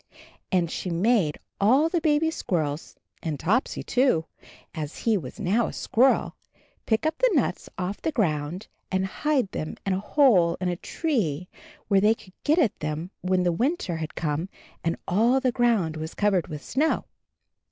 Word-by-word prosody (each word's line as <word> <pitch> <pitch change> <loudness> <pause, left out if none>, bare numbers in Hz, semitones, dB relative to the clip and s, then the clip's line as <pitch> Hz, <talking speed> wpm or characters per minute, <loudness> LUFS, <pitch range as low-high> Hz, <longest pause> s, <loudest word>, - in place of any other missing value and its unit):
And 175 -4 +1
she 185 - -3
made 180 -2 +2 0.2
all 260 +10 +4
the 335 0 0
baby 315 +1 +2
squirrels, 155 - -2 0.3
and 155 -4 -3
Topsy 225 +9 0
too, 245 -11 +2 0.5
as 155 -2 -5
he 225 -2 +4
was 145 -11 -5
now 215 +6 +2
a - - -6
squirrel, 260 +4 +2 0.5
pick 220 +5 +1
up 315 0 0
the - - +4
nuts 240 -9 0
off 185 +2 -3
the 320 - -1
gound, 170 - -1 0.3
and 190 0 +1
hide 260 +2 0
them 155 - -4
in 195 - +1
a 185 - 0
hole 205 - +4
in 180 0 -1
a 175 - -1
tree 180 - -2 0.4
where 195 -2 +4
they 215 +2 +4
could 185 -4 -17
get 305 +3 +3
at 265 - +2
them 155 +4 -4
when 185 0 +1
the 175 - +2
winter 230 - -1
had 160 -1 -5
come 160 +3 -2 0.3
and 165 0 0
all 230 +8 +3
the 260 -1 +1
ground 225 -10 +1
was 160 +1 -6
covered 200 -5 +2
with 150 -1 -7
snow. 305 +5 +1
190 Hz, 175 wpm, -26 LUFS, 165-250 Hz, 0.5 s, all